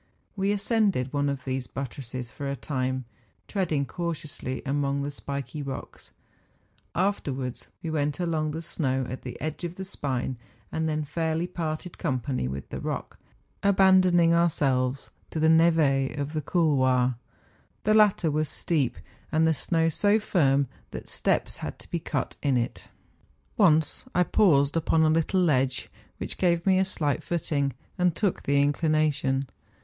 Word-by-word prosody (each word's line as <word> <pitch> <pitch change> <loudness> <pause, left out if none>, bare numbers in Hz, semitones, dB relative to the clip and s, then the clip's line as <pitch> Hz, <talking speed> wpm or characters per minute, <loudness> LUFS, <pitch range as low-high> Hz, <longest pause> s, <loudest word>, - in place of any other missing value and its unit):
We 195 0 +1
ascended 200 - +1
one 145 0 +1
of 140 -2 -4
these 130 -1 -2
but¬ 135 0 -4
tresses 125 -1 -7
for 140 -1 -5
a 140 - -2
time, 130 -1 -2 0.4
treading 160 -8 0
cautiously 155 -6 -4
among 140 0 0
the 145 - -3
spiky 140 0 -5
rocks; 135 -2 -7 0.8
afterwards 140 -10 -2
we 165 - -2
went 145 -1 -1
along 160 -3 0
the 160 +2 -4
snow 135 -6 -1
at 130 - -6
the 125 - -7
edge 155 +3 -4
of 175 0 -4
the 190 - -6
spine, 130 -8 -3 0.3
and 160 0 -1
then 155 0 -1
fairly 160 +2 -1
parted 170 -1 -4
com¬ 130 -6 0
pany 125 - -2
with 70 0 -5
the - - -5
rock, - - -5 0.4
abandoning 185 -3 +5
ourselves 135 -6 +1 0.2
to 160 - -3
the 160 +1 +4
neve 160 -5 +4
of 145 +1 -3
the 155 - -1
couloir. 130 -7 +2 0.7
The 215 - +3
latter 205 -6 +4
was 155 0 0
steep, 140 -8 0 0.3
and 160 +1 +3
the 160 - +4
snow 165 +3 +1
so 205 +6 +3
firm 140 -9 +2 0.2
that - - -8
steps - - +1
had - - -6
to - - -11
be - - 0
cut - - -3
in 135 -3 +2
it. 120 - -3 0.7
Once 160 -7 +3
I 180 - +5
paused 145 -7 +3
upon 160 0 +3
a 155 - +4
little 165 +4 +2
ledge, 130 -6 +1 0.3
which - - -5
gave 170 -2 +2
me 190 -1 +4
a 190 - +3
slight 150 -6 -1
footing, 145 -5 -1 0.3
and 180 -2 +3
took 200 -4 0
the 140 0 +2
inclination. 145 -2 +1
155 Hz, 160 wpm, -27 LUFS, 135-170 Hz, 0.8 s, abandoning